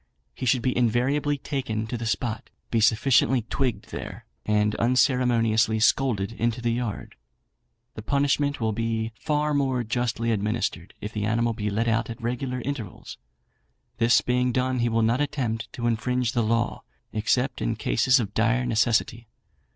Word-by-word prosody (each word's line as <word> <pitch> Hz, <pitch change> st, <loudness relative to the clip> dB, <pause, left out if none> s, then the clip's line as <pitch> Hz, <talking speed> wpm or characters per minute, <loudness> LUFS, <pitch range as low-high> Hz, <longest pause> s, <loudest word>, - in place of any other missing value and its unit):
He 130 Hz, -, -4 dB
should 120 Hz, 0 st, +2 dB
be 130 Hz, -, 0 dB
invariably 130 Hz, +5 st, +1 dB
taken 125 Hz, -6 st, -3 dB
to 115 Hz, -, -5 dB
the 115 Hz, -1 st, -4 dB
spot, 110 Hz, -1 st, -2 dB, 0.2 s
be 115 Hz, -, +2 dB
sufficiently 120 Hz, +2 st, +3 dB
twigged 125 Hz, +1 st, -2 dB
there, -, -, -7 dB, 0.2 s
and 105 Hz, 0 st, +2 dB
unceremoniously 115 Hz, -3 st, +2 dB
scolded 110 Hz, -3 st, +2 dB
into 115 Hz, +1 st, -1 dB
the 120 Hz, -1 st, 0 dB
yard. 115 Hz, -3 st, -4 dB, 0.8 s
The 110 Hz, -, -7 dB
punishment 140 Hz, +3 st, +1 dB
will 110 Hz, -2 st, 0 dB
be 115 Hz, 0 st, -2 dB
far 150 Hz, +5 st, -1 dB
more 135 Hz, -3 st, +1 dB
justly 115 Hz, 0 st, -1 dB
administered 105 Hz, -4 st, -2 dB
if 105 Hz, -, -6 dB
the 105 Hz, -1 st, -2 dB
animal 115 Hz, +2 st, +1 dB
be 105 Hz, -2 st, -3 dB
let 110 Hz, +3 st, -1 dB
out 115 Hz, +1 st, +1 dB
at 115 Hz, +1 st, -7 dB
regular 125 Hz, +2 st, -3 dB
intervals; 120 Hz, -8 st, -6 dB, 0.8 s
this 115 Hz, +1 st, +5 dB
being 125 Hz, 0 st, +1 dB
done 130 Hz, +1 st, 0 dB
he 120 Hz, 0 st, +1 dB
will 115 Hz, 0 st, +1 dB
not 115 Hz, +5 st, +2 dB
attempt 130 Hz, -6 st, -2 dB
to 120 Hz, -, -4 dB
infringe 120 Hz, +1 st, 0 dB
the 120 Hz, -2 st, +1 dB
law, 115 Hz, +2 st, 0 dB, 0.3 s
except 120 Hz, +4 st, 0 dB
in -, -, 0 dB
cases 125 Hz, -, +2 dB
of 105 Hz, -3 st, -3 dB
dire 115 Hz, +3 st, +2 dB
necessity. 115 Hz, 0 st, +1 dB
120 Hz, 160 wpm, -25 LUFS, 110-125 Hz, 0.8 s, this